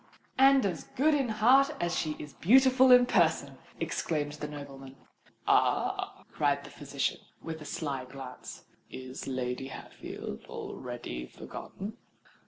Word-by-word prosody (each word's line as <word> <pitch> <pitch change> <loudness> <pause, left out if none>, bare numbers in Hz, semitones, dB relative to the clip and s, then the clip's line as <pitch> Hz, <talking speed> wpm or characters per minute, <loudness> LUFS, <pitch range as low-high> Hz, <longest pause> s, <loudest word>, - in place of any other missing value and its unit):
"And 270 -2 +6
as 180 -5 -2
good 305 +4 +4
in 275 -4 +1
heart 260 +7 +5
as 175 0 0
she 155 -1 -1
is 150 -2 -9
beautiful 260 - +6
in 250 0 +9
person," 160 - +2 0.2
exclaimed 155 -2 -1
the 150 0 -6
nobleman. 135 -2 -9 0.5
"Ah!" - - +1
cried 145 -1 +1
the 145 - -11
physician, 140 -1 -2 0.2
with 160 -1 -6
a - - -8
sly 140 -6 -3
glance: 130 -1 -9 0.2
"is 130 0 -7
Lady 130 0 -2
Hatfield - - -8
already 120 - -6
forgotten?" 205 +3 -8
150 Hz, 130 wpm, -30 LUFS, 135-225 Hz, 0.5 s, in